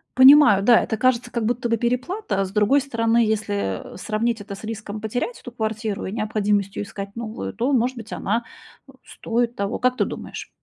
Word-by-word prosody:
Понимаю, 260 -6 +8
да, 235 +2 +6
это 220 - -2
кажется, 245 0 +1
как 235 -3 -2
будто 240 +1 -1
бы 230 - +2
переплата. 245 - -1
А 195 - 0
с 185 - -8
другой 215 +7 +3
стороны, 230 -4 0
если, 205 - -2
э, - - -10
сравнить 220 +2 -1
это 200 -1 -7
с - - -13
риском 215 -1 -6
потерять 245 - -3
эту 245 - -10
квартиру 220 -2 -3
и 190 - -4
необходимостью 210 -2 -1
искать 200 0 -8
новую, 230 -1 -5
то, 245 +5 -1
может 250 0 +1
быть, 225 -1 -9
она, 230 +4 -1 0.5
э, - - -12
стоит 235 +1 -2
того, 200 0 -2
как 255 0 +1
ты - - +1
думаешь? - - -7
225 Hz, 200 wpm, -22 LUFS, 210-245 Hz, 0.5 s, Понимаю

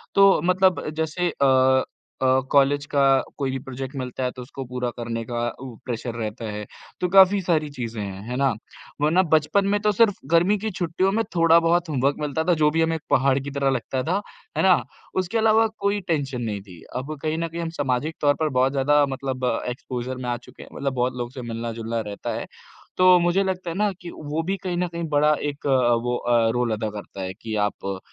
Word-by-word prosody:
तो 195 -4 +6
मतलब 185 +2 +2
जैसे 160 +3 0
अ 130 -1 +4 0.4
अ, 130 0 +4
कॉलेज 140 +1 +3
का 140 -2 +1 0.3
कोई 135 -2 -1
भी 130 - -3
प्रोजेक्ट 135 +1 -7
मिलता 130 0 -4
है 125 - 0
तो 130 - -10
उसको 135 +2 -7
पूरा 125 0 -3
करने 115 -1 -3
का 120 0 -2
उ 130 -3 -8
प्रेशर 120 -1 -4
रहता 115 +1 -4
है, 105 0 -5 0.4
तो 180 - +2
काफ़ी 195 +1 +7
सारी 160 -4 0
चीज़ें 115 -3 -4
हैं, 95 -1 -6
है 125 - -3
ना? 135 -3 +2 0.5
वरना 160 +5 +4
बचपन 155 +6 +3
में 205 +1 +2
तो 210 - +3
सिर्फ़ 205 -1 +3 0.2
गर्मी 180 +5 +4
की 220 +2 -3
छुट्टियों 180 +2 0
में 225 +2 +1
थोड़ा-बहुत 165 +1 +4
होमवर्क 140 -1 +1
मिलता 150 +1 -1
था, 180 - +3
जो 155 -2 +3
भी 165 +1 +1
हमें 165 0 +1
एक 160 - -5
पहाड़ 135 +1 +3
की 140 +1 -6
तरह 140 -1 +1
लगता 130 0 -1
था, 185 +7 0 0.4
है - - +2
ना? 185 -8 +5 0.4
उसके 185 +4 0
अलावा 225 0 +4
कोई 200 +1 +1
टेंशन 140 -7 -1
नहीं 105 -4 -3
थी, 90 -4 -14
अब 140 +4 -4
कहीं 155 0 -1
न 165 - -1
कहीं 170 +1 -5
हम 165 - -3
सामाजिक 140 +3 -1
तौर 145 -1 +4
पर 155 -1 +1
बहुत 130 +1 +3
ज़्यादा 145 +1 +3
मतलब 130 -1 -3 0.2
एक्सपोज़र 125 0 -5
में 125 -1 -4
आ 120 - -1
चुके 120 - -14
हैं, - - -14
मतलब 140 -1 -2
बहुत 125 0 0
लोगों 120 -1 -3
से 130 +1 -8
मिलना-जुलना 115 -1 -4
रहता 100 - -4
है, - - -4 0.5
तो 185 0 +7
मुझे 175 +3 +2
लगता 185 -2 -3
है 165 - -4
ना 210 -1 +2
कि 175 - -7
वो 150 +2 -3
भी 190 +3 -1
कहीं 180 -2 -2
न 180 0 0
कहीं 170 0 -5
बड़ा 150 +1 +4
एक 145 -1 -4
अ, 140 - +2 0.3
वो 120 0 0
अ, 120 -2 +2
रोल 120 -1 0
अदा 110 0 -2
करता 100 -2 -8
है 95 0 -4
कि 110 -1 -4
आप 105 - -5
अ, 95 -1 -3
140 Hz, 220 wpm, -24 LUFS, 125-170 Hz, 0.5 s, काफ़ी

